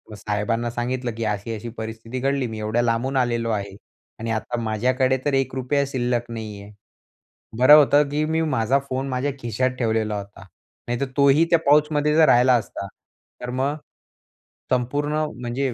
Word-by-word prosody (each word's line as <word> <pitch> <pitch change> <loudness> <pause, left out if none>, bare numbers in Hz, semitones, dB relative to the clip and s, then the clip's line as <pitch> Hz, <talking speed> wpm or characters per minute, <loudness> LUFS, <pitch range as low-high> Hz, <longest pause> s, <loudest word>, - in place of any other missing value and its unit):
साहेबांना 105 +3 -2
सांगितलं 120 +1 -2
की 115 - -3
अशी 105 +2 -2
अशी 115 +2 -7
परिस्थिती 115 +3 -6
घडली. 135 -1 0
मी 110 -1 -6
एवढ्या 110 +3 0
लांबून 120 +3 0
आलेलो 120 -2 0
आहे. 100 -2 -3 0.4
आणि 115 0 -3
आता 115 +2 -2
माझ्याकडे 130 +4 +1
तर 145 - +1
₹1 135 +1 0
शिल्लक 120 -2 -2
नाहीये. 105 -3 -7 0.9
बरं 145 +4 +9
होतं 145 0 +5
की 150 +1 -1
मी 160 +1 0
माझा 135 -3 +1
फोन 130 +1 -2
माझ्या 130 +3 -1
खिशात 130 +2 -1
ठेवलेला 110 -2 0
होता. 100 0 -9 0.5
नाहीतर 120 +3 -1
तोही 140 +3 +5
त्या 170 - +4
पाउचमध्ये 150 +1 +3
जर 160 -1 +6
राहिला 125 +1 +5
असता 100 -3 -3 0.5
तर 125 - -5
मग 135 +4 -1 1.0
संपूर्ण 145 +5 0 0.3
म्हणजे 125 +1 -2
125 Hz, 155 wpm, -23 LUFS, 115-140 Hz, 1.0 s, बरं